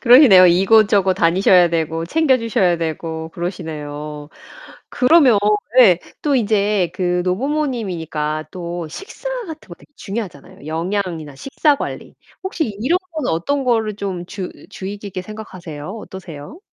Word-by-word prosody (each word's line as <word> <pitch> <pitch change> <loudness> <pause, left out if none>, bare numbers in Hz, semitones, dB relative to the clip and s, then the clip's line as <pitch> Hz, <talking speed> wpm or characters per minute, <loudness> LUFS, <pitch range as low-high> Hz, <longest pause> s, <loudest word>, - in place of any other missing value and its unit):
그러시네요. 240 -7 +8
이곳저곳 195 +2 +4
다니셔야 180 +1 +4
되고 165 0 -2
챙겨 280 - +2
주셔야 215 -7 +1
되고 160 0 -4
그러시네요. 150 -4 -6 0.6
그러면 265 -4 +5 0.4
예 195 -9 +7 0.2
또 290 -2 +2
이제 205 -5 +1
그 180 -1 0
노부모님이니까 185 - -2
또 175 -1 -5
식사 390 - -8 0.2
같은 320 -2 -10
거 175 - -9
되게 170 - -22
중요하잖아요. 195 -9 -7
영양이나 165 -2 -3
식사 275 - +1
관리. - - -6 0.3
혹시 350 -5 -1 0.2
이런 335 +9 +2
거는 310 -5 -2
어떤 270 +13 -1
거를 225 -4 0
좀 190 -4 -4
주으 185 -1 -6 0.2
주의 200 0 -6
깊게 200 -2 -6
생각하세요? 180 -7 -9
어떠세요? 190 - -10
190 Hz, 325 characters per minute, -19 LUFS, 165-230 Hz, 0.6 s, 그러시네요